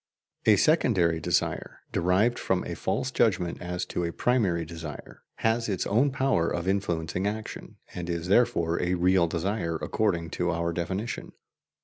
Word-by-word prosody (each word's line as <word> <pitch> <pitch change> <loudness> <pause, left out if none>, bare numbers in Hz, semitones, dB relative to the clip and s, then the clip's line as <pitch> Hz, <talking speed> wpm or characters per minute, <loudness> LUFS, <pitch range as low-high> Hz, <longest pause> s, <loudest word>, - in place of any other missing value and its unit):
A 110 - +8
secondary 95 - +3
desire, 75 - -1
derived 95 +8 +2
from 95 -1 0
a - - -4
false 130 - -2
judgment 95 -9 +1
as 90 0 -3
to 90 - -3
a 85 - -1
primary 95 -8 +1
desire, 80 -3 -9
has 115 0 0
its 95 -3 -1
own 120 +8 +3
power 130 -11 +1
of 85 +1 -3
influencing 90 -1 -1
action, 110 +1 -5 0.2
and 90 -1 -5
is 85 0 -2
therefore 95 -6 +2
a 90 +1 +1
real 90 0 +3
desire 85 0 -2
according 85 -1 -1
to 90 0 -1
our 85 0 -1
definition. 95 +7 -4
90 Hz, 150 wpm, -27 LUFS, 85-110 Hz, 0.2 s, A